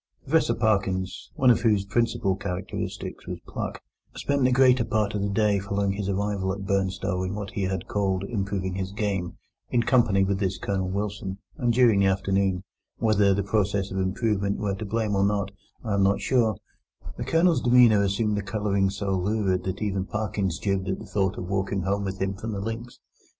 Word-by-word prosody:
Professor - - +2
Parkins, 95 -3 0
one 130 -2 +5
of 115 - +2
whose 105 -4 +2
principal 100 -3 +1
characteristics 90 -1 -5
was - - -4
pluck, - - -5 0.3
spent 140 -1 0
the 130 - +4
greater 130 -1 +5
part 110 -2 0
of 105 - -1
the 100 - 0
day 105 0 +2
following 100 0 -1
his 100 0 -3
arrival 100 -1 -1
at 100 0 -5
Burnstow 95 -1 0
in 95 +2 -3
what 100 -2 -5
he 100 - -3
had 95 -2 -3
called 95 -2 0
improving 100 -3 -2
his 95 0 -3
game, 100 -4 -2 0.3
in 120 -1 +2
company 115 -6 +3
with 95 0 0
this 95 -1 -1
Colonel 95 -2 -2
Wilson: 100 -1 -3 0.2
and 120 -5 +1
during 115 -4 +4
the 100 - +4
afternoon—whether 95 +2 0
the 100 - 0
process 100 -1 0
of 95 - -2
improvement 100 +1 0
were 100 -2 -1
to 100 +3 -5
blame 110 0 -1
or 95 - +2
not, 100 -1 0 0.3
I 110 -4 -2
am 100 - +2
not 100 +1 +3
sure—the 115 -6 -2
Colonel's 165 0 +3
demeanour 120 -4 +6
assumed 100 +1 +1
a - - -2
colouring 100 -1 0
so 100 0 -2
lurid 95 -1 0
that 95 +3 -3
even 95 -2 -1
Parkins 100 -5 -2
jibbed 95 -1 -1
at 95 - -1
the - - -9
thought 100 -1 -1
of 90 - -5
walking 95 0 -1
home 100 +1 0
with 95 0 -4
him 95 0 0
from 110 +3 -5
the 100 - -3
links. 115 +4 -5
100 Hz, 190 wpm, -26 LUFS, 95-105 Hz, 0.3 s, demeanour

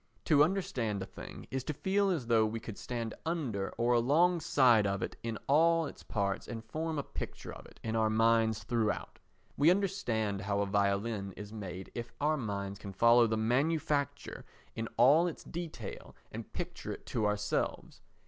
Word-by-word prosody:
To 150 -3 +6
understand 125 - -1
a - - -5
thing - - -10
is 135 -1 -2
to 155 - -3
feel 195 +4 +1
as 165 -10 -1
though 115 -1 +4
we 110 +1 -1
could 110 -2 -8
stand 115 -3 -4
under 135 - -2
or 120 +1 +2
alongside 135 - +4
of 100 0 -1
it - - -4
in 115 -1 -3
all 165 +3 +4
its - - -8
parts 100 -3 -2
and 115 -1 -6
form 160 +6 -3
a 145 - -1
picture - - -7
of - - -11
it - - -19
in 110 0 -2
our 110 -1 +3
minds 110 0 +3
throughout. 110 -1 -1 0.4
We 150 +3 +5
understand 125 - 0
how 100 0 0
a - - +1
violin 100 0 0
is 105 +1 -9
made 95 -3 -7
if 120 0 -5
our 150 +2 +2
minds 100 -6 -4
can 100 -1 -8
follow 115 +4 +6
the 110 0 0
manufacture 140 +5 0 0.3
in 115 0 -3
all 145 +9 +6
its 170 - -6
detail 160 - -7 0.2
and - - -7
picture - - -5
it - - -8
to 105 - +2
ourselves. 105 0 -2
115 Hz, 175 wpm, -32 LUFS, 105-150 Hz, 0.4 s, To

